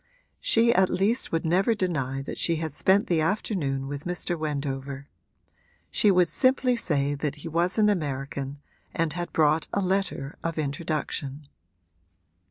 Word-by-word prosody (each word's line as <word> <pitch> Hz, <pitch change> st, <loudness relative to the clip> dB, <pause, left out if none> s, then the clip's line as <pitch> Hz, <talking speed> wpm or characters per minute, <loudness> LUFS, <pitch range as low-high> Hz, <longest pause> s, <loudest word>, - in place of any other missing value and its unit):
She 230 Hz, +1 st, +4 dB
at 190 Hz, -4 st, +4 dB
least 200 Hz, +7 st, +1 dB
would 165 Hz, +1 st, -1 dB
never 190 Hz, +7 st, +3 dB
deny 135 Hz, -9 st, -1 dB
that -, -, -6 dB
she 170 Hz, -, +2 dB
had 160 Hz, -2 st, -3 dB
spent 195 Hz, +7 st, +3 dB
the 165 Hz, -3 st, +1 dB
afternoon 155 Hz, -7 st, -1 dB
with 145 Hz, +1 st, -6 dB
Mr. 175 Hz, 0 st, -2 dB
Wendover: 140 Hz, -3 st, -4 dB, 0.8 s
she 210 Hz, -, +4 dB
would 180 Hz, -2 st, +5 dB
simply 255 Hz, -1 st, +2 dB
say 145 Hz, -10 st, 0 dB
that 145 Hz, 0 st, -2 dB
he 150 Hz, +2 st, -8 dB
was 170 Hz, +4 st, 0 dB
an 215 Hz, -1 st, +5 dB
American 140 Hz, -5 st, -2 dB, 0.3 s
and 165 Hz, -2 st, 0 dB
had 175 Hz, 0 st, -4 dB
brought 155 Hz, 0 st, +2 dB
a -, -, 0 dB
letter 190 Hz, -7 st, -1 dB
of 165 Hz, -1 st, -2 dB
introduction. 145 Hz, -1 st, -3 dB
160 Hz, 150 wpm, -26 LUFS, 140-185 Hz, 0.8 s, would